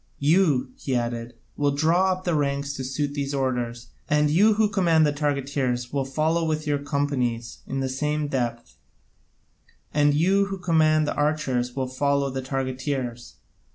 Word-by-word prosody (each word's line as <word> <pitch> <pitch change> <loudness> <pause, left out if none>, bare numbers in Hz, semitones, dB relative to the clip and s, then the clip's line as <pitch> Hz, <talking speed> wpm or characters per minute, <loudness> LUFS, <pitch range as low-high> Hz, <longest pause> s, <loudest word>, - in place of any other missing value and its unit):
You," 155 - +2
he 135 - -2
added, 120 0 -3 0.2
"will 145 0 +1
draw 170 +6 +3
up 185 0 -3
the 175 - 0
ranks 140 -1 -1
to 135 - -5
suit 140 +2 -2
these 140 -1 -2
orders, 120 -3 -2 0.2
and 150 0 +3
you 205 +7 +5
who 215 0 +3
command 175 -6 +3
the 145 - +1
targeteers 140 -4 -1
will 140 -2 0
follow 155 +5 0
with 155 -1 -1
your 145 -1 0
companies 135 -5 -2
in 135 0 -2
the 135 - 0
same 150 +3 -1
depth, 120 -4 -3 1.2
and 145 -1 +3
you 190 +6 +3
who 195 0 -5
command 155 -3 +3
the - - 0
archers 135 -5 0
will 135 -1 -1
follow 140 +1 0
the 130 0 -3
targeteers. 130 - -3
145 Hz, 160 wpm, -25 LUFS, 130-155 Hz, 1.2 s, you